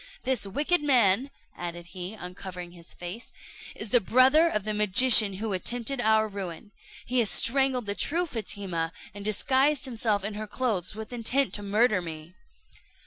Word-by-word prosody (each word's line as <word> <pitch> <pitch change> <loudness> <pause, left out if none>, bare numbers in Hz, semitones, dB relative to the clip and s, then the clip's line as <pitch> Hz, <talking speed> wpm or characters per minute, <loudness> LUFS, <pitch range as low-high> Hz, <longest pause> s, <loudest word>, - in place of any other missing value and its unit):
This 255 -6 0
wicked 295 - +1
man," 250 -3 +3 0.3
added 175 0 -7
he, 185 +3 -6
uncovering 180 -2 -8
his 170 -1 -15
face, 180 +7 -8 0.4
"is 215 - -7
the 245 - +4
brother 265 - +4
of 210 -10 -2
the 215 +1 -3
magician 210 +1 +5
who 210 +2 -4
attempted 245 +7 -2
our 220 0 +3
ruin. 195 -1 -8 0.3
He 250 +1 0
has 225 -4 +3
strangled 260 -1 +3
the 200 - -2
true 335 +11 0
Fatima, 195 - -3 0.2
and 205 0 -9
disguised 265 +7 +1
himself 220 -5 -1
in 210 +1 -4
her 215 +1 -6
clothes 210 -6 -3
with 220 +2 -8
intent 245 +3 +1
to 205 - -5
murder 210 0 +2
me." 160 0 -9
215 Hz, 160 wpm, -27 LUFS, 190-255 Hz, 0.4 s, magician